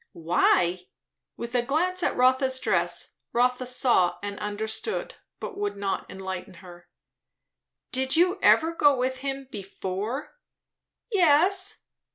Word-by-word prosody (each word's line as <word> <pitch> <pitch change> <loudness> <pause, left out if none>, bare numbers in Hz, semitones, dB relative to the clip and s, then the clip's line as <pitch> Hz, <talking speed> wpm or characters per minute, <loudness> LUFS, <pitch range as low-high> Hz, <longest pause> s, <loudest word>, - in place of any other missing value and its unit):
"Why 175 +1 +2 0.2
" - - -60
with 235 +1 -6
a 245 - +3
glance 350 +8 0
at - - 0
Rotha's 260 +1 +3
dress. - - 0 0.2
Rotha 250 +1 +1
saw 245 -8 +2
and 205 0 -5
understood, 220 - -3 0.3
but 400 - -7
would 410 - -2
not 200 -1 -3
enlighten 190 -1 -6
her. 175 0 -14 1.0
"Did 260 +1 +1
you 360 +4 +3
ever 325 +1 +4
go 290 -3 +4
with 260 +1 -1
him 270 0 -4
before?" 205 - -5 0.7
"Yes." 370 +1 +3
255 Hz, 125 wpm, -26 LUFS, 195-300 Hz, 1.0 s, ever